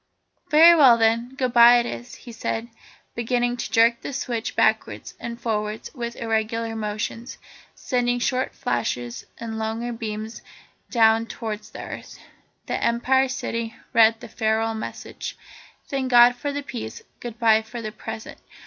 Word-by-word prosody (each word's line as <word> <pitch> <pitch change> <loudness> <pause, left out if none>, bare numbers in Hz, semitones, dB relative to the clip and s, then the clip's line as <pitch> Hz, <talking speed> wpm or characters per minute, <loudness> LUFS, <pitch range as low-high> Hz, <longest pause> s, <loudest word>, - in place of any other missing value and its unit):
"Very 325 +3 +8
well 265 -7 +7
then; 230 +3 +1
goodbye 245 -2 +6
it 240 - +1
is," 240 0 -7
he 240 - -12
said, 225 0 -3 0.4
beginning 245 +1 0
to - - -4
jerk 230 +1 +4
the - - -6
switch 240 -3 -3
backwards - - 0
and 235 0 -6
forwards 215 -2 -3
with 235 -4 -5
irregular 225 0 -2
motions, 215 +3 -4 0.4
sending 245 -1 0
short 255 +1 -1
flashes 120 - -3
and 225 -1 -5
longer 225 +2 -3
beams 220 0 -6 0.5
down 225 -1 +4
towards 215 -2 -6
the - - -8
earth. - - -9 0.5
The - - -3
Empire 260 +3 +2
City 230 -3 -4 0.2
read 225 0 +5
the - - -8
farewell 225 0 0
message. 220 - -7 0.5
"Thank 270 -2 -2
God 245 0 +7
for 285 +4 -3
the 285 0 -4
peace. 110 - -7 0.2
Goodbye 230 -2 +2
for 220 +2 -8
the 215 -2 -5
present. 220 +1 -8
230 Hz, 145 wpm, -24 LUFS, 220-245 Hz, 0.5 s, Very